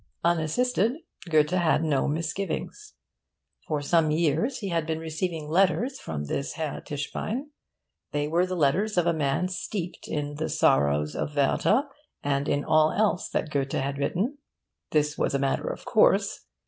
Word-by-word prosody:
Unassisted 190 +8 +2 0.4
Goethe 155 -2 +3
had 175 -3 +2
no 145 -4 +1
misgivings. 190 - -3 0.7
For 150 -2 -1
some 160 +1 +3
years 165 - +1
he 205 -5 -4
had 165 -3 -1
been 160 -1 -1
receiving 160 0 -3
letters 195 - +2
from 75 -2 -4
this 140 - -3
Herr 155 -4 -4
Tischbein. 215 - -4 0.6
They 145 0 -1
were 170 +4 +2
the 185 - -3
letters 180 +7 +1
of 175 - +4
a 170 - +3
man 150 +3 0
steeped 185 -1 -5
in 145 -1 -3
the 160 - -2
Sorrows 70 +2 +2
of 150 - -3
Werther 195 - +3 0.4
and 140 0 0
in 145 0 0
all 155 0 +4
else 205 -3 +1
that 155 - -2
Goethe 140 -2 -1
had 140 +1 -1
written. 205 - -1 0.5
This 150 -1 +1
was - - +1
a - - +4
matter 135 0 0
of - - -5
course. - - +3
160 Hz, 160 wpm, -27 LUFS, 145-185 Hz, 0.7 s, of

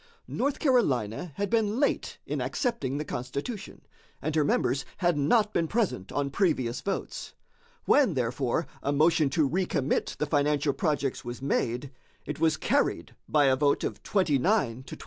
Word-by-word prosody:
North 280 +2 -1
Carolina 165 - +1
had 200 +4 -1
been 225 0 +1
late 285 - 0
in - - -3
accepting 235 - -1
the 150 - -3
Constitution, 140 - -5 0.4
and 155 +1 -3
her 155 - +4
members 135 -1 +1
had 175 -3 +2
not 210 +9 +2
been 165 -1 +1
present 205 - -1
on 140 -1 -1
previous 135 -9 0
votes. 195 - -4 0.5
When, 260 - +4
therefore, 125 +4 0 0.2
a 140 - 0
motion 155 0 +3
to 150 +1 +2
recommit 155 -4 -1
the - - 0
financial 145 -1 +1
projects 145 -1 -1
was 120 0 -6
made, 130 0 -1 0.3
it 150 0 -5
was 160 0 +2
carried - - 0 0.2
by 150 -2 +4
a 135 -1 +4
vote 140 +1 +2
of - - -3
29 185 -8 +2 0.5
to - - -8
27. - - -18
150 Hz, 160 wpm, -28 LUFS, 135-190 Hz, 0.5 s, her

